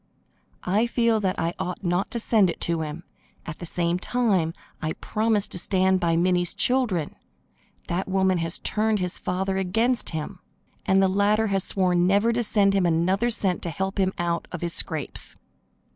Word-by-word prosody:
"I 210 +6 +1
feel 230 -2 +2
that 190 -3 -1
I 165 +1 -1
ought 180 +2 -4
not 180 +2 0
to 235 - -3
send 215 -4 +3
it - - -5
to 170 -1 0
him, 155 +2 -5 0.4
at 165 - -7
the 175 - -7
same 170 +1 -1
time 195 -7 +1 0.3
I 155 -1 -2
promised 215 -1 0
to 180 - 0
stand 190 0 +2
by 170 -2 +1
Minnie's 175 0 +1
children. 235 - 0 0.7
That 180 +3 -2
woman 190 -1 +2
has 165 +1 0
turned 215 0 0
his 180 -2 -3
father 190 +1 -2
against 225 +7 +1
him, 160 +4 -5 0.5
and 190 0 +4
the - - +4
latter 205 +3 +2
has 195 -1 +1
sworn 180 -2 +2
never 205 +5 +3
to 240 - 0
send 205 -3 +2
him 190 -3 +2
another 185 +7 +1
cent 195 -6 0
to 170 - -4
help 190 +5 -3
him 190 -1 +2
out 170 -1 -2
of 180 - -6
his 170 -1 -3
scrapes." 155 -4 -3
190 Hz, 180 wpm, -25 LUFS, 175-205 Hz, 0.7 s, and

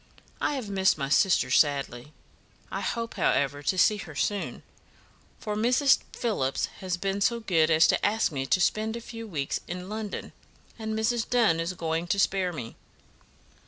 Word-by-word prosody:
I 295 - 0
have 255 -6 -4
missed 190 -3 +2
my 135 -2 -3
sister, 150 -5 +3
sadly. 140 -2 +1 0.6
I - - -3
hope, 230 -2 -3
however, 145 -4 +1
to 185 +6 0
see 210 +4 +4
her 160 -7 -9
soon, 200 +8 -2 0.8
for 210 -1 -4
Mrs. 250 +6 +4
Phillips 140 - -1
has 185 -2 -2
been 195 +2 -2
so 235 +3 +2
good 170 -8 +2
as 160 0 +5
to - - +2
ask 215 -2 +2
me 135 -2 -3
to 185 - +3
spend 215 +4 +1
a - - -4
few 230 -1 -8
weeks 145 -8 -2
in 180 +1 -6
London, 215 -2 -5 0.5
and 220 0 -3
Mrs. 225 +1 0
Dunn 225 -10 +3
is 165 +2 -2
going 165 0 -2
to 200 - 0
spare 190 -2 +1
me." 125 -9 -7
190 Hz, 170 wpm, -27 LUFS, 160-220 Hz, 0.8 s, as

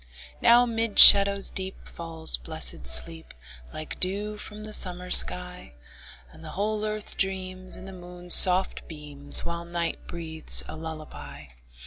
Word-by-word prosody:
Now 240 +1 +2
'mid 230 -2 -6
shadows 200 0 +5
deep 190 0 -9
Falls 165 - -3
blessed - - -4
sleep, 65 +5 +3 0.4
Like 155 0 -12
dew 205 +3 -5
from 210 0 -14
the 215 0 -12
summer 180 -2 -3
sky; 180 - +4 0.6
And - - -20
the - - -13
whole 210 +1 -5
earth 215 0 -8
dreams, 185 -1 -7
In - - -15
the 195 - -14
moon's 180 -1 -7
soft 185 +1 0
beams, 145 -2 -2
While 170 0 -8
night 170 -1 -8
breathes 160 -2 -1
a - - -12
lullaby. 155 - -13
180 Hz, 140 wpm, -22 LUFS, 160-200 Hz, 0.6 s, shadows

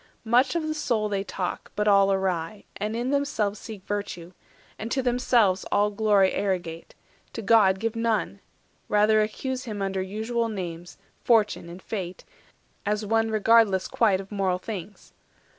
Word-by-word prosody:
Much 250 +6 +3
of 330 -2 0
the 310 - -1
Soul 235 -8 -1
they 195 -1 -1
talk, 185 -2 -5
but 210 0 0
all 200 -1 +5
awry; 190 0 -1
And 215 +2 -3
in 245 +3 -1
themselves 280 -8 0
seek 210 -4 -9
virtue; 190 -4 -4 0.5
and 220 - -4
to 265 - 0
themselves 240 -6 +2
All 205 +1 +3
glory 205 -2 +3
arrogate, 175 -4 -3 0.4
to 225 - -5
God 200 -3 +5
give 225 +1 -2
none; 225 -3 -1 0.5
Rather 215 +1 +4
accuse 255 +4 -3
him 215 -3 -5
under 195 -1 -1
usual 220 +4 -2
names, 175 -4 -6 0.3
Fortune 215 -7 +2
and 175 +2 -10
Fate, 185 -4 -5 0.6
as 210 +1 -1
one 225 +1 +1
regardless 215 -3 +3
quite 205 -5 +2
Of 195 +1 -9
mortal 195 -3 0
things. 200 0 -8
210 Hz, 155 wpm, -26 LUFS, 190-225 Hz, 0.6 s, all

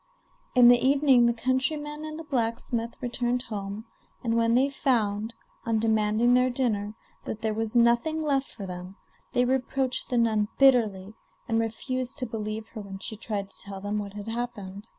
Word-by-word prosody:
In 250 -1 +8
the 245 0 +7
evening 270 -3 +5
the - - +4
countryman 295 +5 -1
and 310 0 -6
the - - -6
blacksmith 235 -3 -2
returned 245 0 -1
home, 205 -1 -5 0.4
and 230 -2 0
when 230 0 +3
they 260 +3 +4
found, 230 -5 0 0.3
on 230 -1 0
demanding 220 +2 +2
their 250 +1 +4
dinner, 220 -5 -1 0.3
that 220 - -5
there 220 -1 +1
was 225 +1 -3
nothing 235 +7 +3
left 280 -3 +1
for 200 - -8
them, 180 +1 -7 0.4
they 245 - +3
reproached 260 0 -1
the 245 - 0
nun 220 -3 +2
bitterly, 220 -7 +3 0.3
and 225 -1 +1
refused 255 +4 -3
to 255 - -1
believe 215 -1 -4
her 215 - -7
when 195 -1 -8
she 220 - -5
tried 205 -2 -4
to - - -7
tell 195 0 -6
them 205 +2 -2
what 200 -1 -6
had 205 +1 -8
happened. 225 -3 -5
230 Hz, 175 wpm, -27 LUFS, 210-255 Hz, 0.4 s, In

